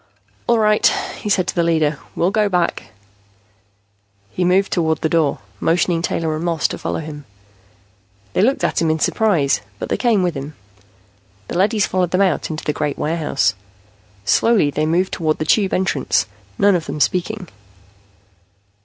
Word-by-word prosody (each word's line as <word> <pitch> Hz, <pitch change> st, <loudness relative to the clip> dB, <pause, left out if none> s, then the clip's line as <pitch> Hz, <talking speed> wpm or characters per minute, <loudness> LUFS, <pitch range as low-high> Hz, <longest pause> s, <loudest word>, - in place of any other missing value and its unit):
"All 235 Hz, -, +4 dB
right," 215 Hz, -1 st, +4 dB, 0.3 s
he 210 Hz, -, -4 dB
said 185 Hz, -3 st, +2 dB
to -, -, -1 dB
the 175 Hz, -, +1 dB
leader. 160 Hz, -3 st, +1 dB, 0.2 s
"We'll 175 Hz, +3 st, +1 dB
go 210 Hz, 0 st, +2 dB
back." 180 Hz, -3 st, 0 dB, 1.5 s
He 180 Hz, -, -2 dB
moved 185 Hz, +2 st, +2 dB
toward 160 Hz, -3 st, +1 dB
the 160 Hz, -, +1 dB
door, 160 Hz, -4 st, +1 dB, 0.2 s
motioning 170 Hz, 0 st, +1 dB
Taylor 165 Hz, -2 st, -1 dB
and 155 Hz, -, -4 dB
Moss 170 Hz, -2 st, +1 dB
to -, -, -5 dB
follow -, -, -3 dB
him. 150 Hz, -2 st, -8 dB, 1.1 s
They -, -, +2 dB
looked 260 Hz, +7 st, +2 dB
at -, -, +1 dB
him 165 Hz, -, +2 dB
in 160 Hz, -, +1 dB
surprise, 160 Hz, -, +1 dB, 0.2 s
but -, -, -6 dB
they -, -, 0 dB
came 225 Hz, -6 st, +2 dB
with 175 Hz, -2 st, 0 dB
him. 145 Hz, +1 st, -7 dB, 0.9 s
The -, -, -3 dB
leadys 210 Hz, +2 st, +2 dB
followed 185 Hz, -2 st, 0 dB
them 185 Hz, +2 st, +1 dB
out 185 Hz, -6 st, +1 dB
into 155 Hz, -1 st, -5 dB
the 150 Hz, -, -1 dB
great 150 Hz, -1 st, -2 dB
warehouse. 155 Hz, -, 0 dB, 0.7 s
Slowly 200 Hz, -, +3 dB
they 155 Hz, +2 st, -1 dB
moved 180 Hz, +4 st, +1 dB
toward 155 Hz, -3 st, 0 dB
the 155 Hz, -, -3 dB
Tube 195 Hz, +4 st, +2 dB
entrance, 185 Hz, -7 st, +1 dB, 0.3 s
none 200 Hz, 0 st, +4 dB
of 165 Hz, -3 st, -2 dB
them 150 Hz, +2 st, -4 dB
speaking. 185 Hz, +5 st, -1 dB
170 Hz, 170 wpm, -19 LUFS, 155-195 Hz, 1.5 s, All